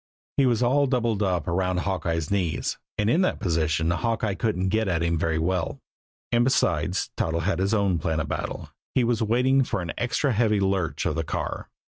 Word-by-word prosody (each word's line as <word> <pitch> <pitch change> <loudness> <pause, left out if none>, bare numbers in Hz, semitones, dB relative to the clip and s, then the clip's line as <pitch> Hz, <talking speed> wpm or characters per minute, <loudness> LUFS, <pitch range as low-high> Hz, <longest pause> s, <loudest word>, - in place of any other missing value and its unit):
He 135 - +4
was 120 -1 +2
all 140 +4 +3
doubled 120 -5 0
up 90 -6 0
around 90 +1 0
Hawkeye's 85 -4 -2
knees, 90 -5 -1 0.2
and 105 - +1
in 145 +11 +3
that 185 - +1
position 80 -1 +1
Hawkeye 110 +2 0
couldn't 95 -2 -1
get 110 +2 +1
at 85 -3 0
him 85 0 +1
very 80 0 0
well; 85 +2 -1 0.5
and, 120 0 +4
besides, 130 - +1
Toddles 80 +1 0
had 95 -1 0
his 100 +3 +1
own 100 -5 +1
plan 80 0 -1
of 80 - -2
battle. - - -4 0.3
He 130 - +4
was 115 -1 +1
waiting 125 +5 +3
for 120 - -2
an 85 -2 -4
extra 125 +3 +1
heavy 110 -2 +2
lurch 95 -4 0
of - - +1
the 80 +1 -1
car. - - -4
95 Hz, 195 wpm, -25 LUFS, 85-115 Hz, 0.5 s, He